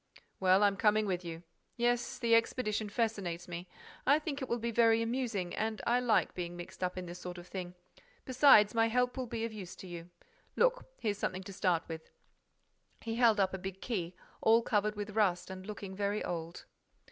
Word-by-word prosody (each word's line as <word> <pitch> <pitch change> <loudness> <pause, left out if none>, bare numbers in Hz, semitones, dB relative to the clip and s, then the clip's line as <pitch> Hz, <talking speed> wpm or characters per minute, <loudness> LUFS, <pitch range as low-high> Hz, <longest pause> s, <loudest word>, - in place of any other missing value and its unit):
"Well, 190 +1 +5
I'm 200 -1 +3
coming 215 +1 +3
with 185 -2 -2
you. 165 0 -7 0.3
Yes, 240 0 +1
the 230 -1 +1
expedition 225 -2 +1
fascinates 200 -6 -2
me. 175 +1 -6 0.4
I 285 +3 +5
think 300 -2 -4
it 265 - -4
will 235 - +1
be 235 0 -2
very 230 0 +4
amusing 230 -7 -2
and 220 0 -2
I 240 +1 +3
like 240 -3 +2
being 175 -1 -5
mixed 175 +1 -8
up 180 0 -1
in 185 - -4
this 175 +1 -8
sort 180 0 -7
of 175 - -9
thing.—Besides, 210 - +2
my 225 -1 +3
help 250 +2 +1
will 255 -1 -3
be 230 0 -3
of 230 - -5
use 185 -3 -8
to 190 - -11
you. 175 -1 -8 0.5
Look, - - +2
here's 210 -3 -1
something 185 -1 -2
to 195 +1 -9
start 185 -4 +1
with." 160 -1 -7 0.9
He 225 - -4
held 230 -4 +5
up 190 -1 +2
a 190 - -3
big 190 0 -6
key, 185 -8 -3 0.3
all 225 +1 +5
covered 210 -1 +1
with 205 0 -5
rust 195 -4 +1
and 190 +1 -8
looking 200 -2 -6
very 205 +1 -1
old. 170 0 -5
205 Hz, 195 wpm, -32 LUFS, 180-230 Hz, 0.9 s, Well